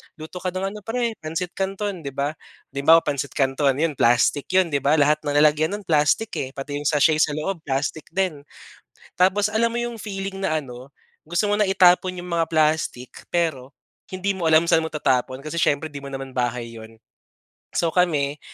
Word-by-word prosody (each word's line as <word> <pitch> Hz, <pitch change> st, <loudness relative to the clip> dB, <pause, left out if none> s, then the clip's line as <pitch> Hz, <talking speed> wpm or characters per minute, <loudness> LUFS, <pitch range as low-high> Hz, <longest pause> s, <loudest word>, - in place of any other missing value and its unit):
"Luto 160 Hz, +2 st, -9 dB
ka 185 Hz, -, -4 dB
ng 190 Hz, +1 st, -2 dB
ano 210 Hz, -, -8 dB
p're 230 Hz, -1 st, -2 dB
pansit 165 Hz, +3 st, -4 dB
canton." 195 Hz, -3 st, -3 dB
Di 140 Hz, -, -5 dB
ba. 140 Hz, +2 st, -1 dB, 0.4 s
Di 140 Hz, -, -5 dB
ba, 165 Hz, +1 st, +8 dB
pansit 140 Hz, -3 st, -3 dB
canton 135 Hz, 0 st, +1 dB
'yun 160 Hz, -4 st, 0 dB
plastic 120 Hz, +4 st, +3 dB
yun 185 Hz, -2 st, +4 dB
di 145 Hz, -, +2 dB
ba, 140 Hz, +3 st, +2 dB
lahat 150 Hz, 0 st, +3 dB
ng 145 Hz, -, -1 dB
lalagyan 155 Hz, +4 st, +3 dB
nun 205 Hz, -, -8 dB
plastic, 165 Hz, +6 st, +2 dB
eh, 130 Hz, -, -4 dB
pati 145 Hz, +1 st, -5 dB
yung 145 Hz, -, -2 dB
sachet 155 Hz, +1 st, +3 dB
sa 150 Hz, -2 st, +2 dB
loob 175 Hz, +4 st, -3 dB
plastic 140 Hz, +3 st, -2 dB
din. 175 Hz, -7 st, -1 dB, 0.7 s
Tapos 200 Hz, +3 st, +3 dB
alam 230 Hz, +1 st, +2 dB
mo -, -, -1 dB
yung 240 Hz, -1 st, -5 dB
feeling 195 Hz, -2 st, -5 dB
na 175 Hz, -5 st, 0 dB
ano, 125 Hz, 0 st, -11 dB, 0.4 s
gusto 175 Hz, +6 st, 0 dB
mo 205 Hz, -, +1 dB
na 210 Hz, -2 st, +2 dB
itapon 185 Hz, -1 st, +4 dB
yung 180 Hz, 0 st, -7 dB
mga 165 Hz, -1 st, +1 dB
plastic 155 Hz, -5 st, 0 dB, 0.2 s
pero 155 Hz, -6 st, -2 dB, 0.3 s
hindi 190 Hz, +2 st, -2 dB
mo 185 Hz, -4 st, -3 dB
alam 160 Hz, +1 st, +5 dB
sa'n 165 Hz, -2 st, +4 dB
mo 160 Hz, -, -2 dB
tatapon, 130 Hz, -2 st, 0 dB
kasi 155 Hz, +2 st, -4 dB
siyempre 150 Hz, +1 st, +1 dB
'di 140 Hz, -, -7 dB
mo 140 Hz, -, -8 dB
naman 135 Hz, -1 st, -7 dB
bahay 120 Hz, -2 st, -2 dB
'yun. 110 Hz, 0 st, -12 dB, 0.8 s
So, 165 Hz, -2 st, +1 dB
kami 150 Hz, -5 st, +1 dB
155 Hz, 200 wpm, -23 LUFS, 140-185 Hz, 0.8 s, ba